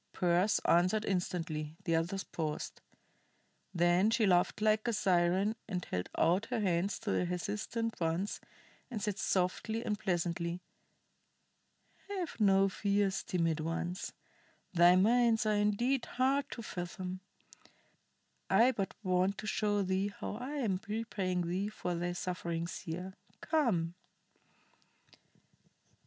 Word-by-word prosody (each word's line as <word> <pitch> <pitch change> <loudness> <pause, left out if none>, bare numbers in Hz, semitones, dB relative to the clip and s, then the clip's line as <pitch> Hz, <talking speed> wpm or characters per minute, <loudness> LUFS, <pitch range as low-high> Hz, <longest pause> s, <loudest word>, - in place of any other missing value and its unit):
Pearse 180 +3 +2
answered 185 +6 +3
instantly; 165 -5 -2
the 170 -3 0
others 175 +4 -1
paused. 155 -2 -4 0.9
Then 175 +4 +3
she 225 -1 +3
laughed 180 0 +3
like 215 +1 +2
a 235 - +1
siren 190 +1 +2
and 180 -5 -3
held 90 0 -3
out 185 +6 +3
her 245 -1 -1
hands 190 -1 +1
to 220 -3 -2
the - - +1
hesitant 210 +6 -3
ones, 170 +4 -1 0.5
and 235 -4 -4
said 210 -1 -2
softly 210 +5 0
and 210 -1 -1
pleasantly: 175 -2 -1 1.5
"Have 370 -10 -4
no 195 -2 +5
fears, 200 0 0
timid 165 -3 0
ones. 170 +3 -3 0.6
Thy 175 0 +7
minds 230 +3 +4
are 215 - +3
indeed 210 +5 +1
hard 270 +2 +1
to 230 - -7
fathom. 180 0 -5 1.3
I 245 +3 +5
but 200 -6 -3
want 185 +1 +1
to - - -6
show 205 -1 +1
thee 190 +2 0
how 210 - -4
I 255 +5 -5
am 215 -10 -1
repaying 205 -5 -1
thee 190 +4 -1
for 180 -4 -3
thy 175 +1 -2
sufferings 170 -2 -3
here. 180 +3 -6 0.3
Come." 220 - +1
190 Hz, 125 wpm, -33 LUFS, 175-215 Hz, 1.5 s, Thy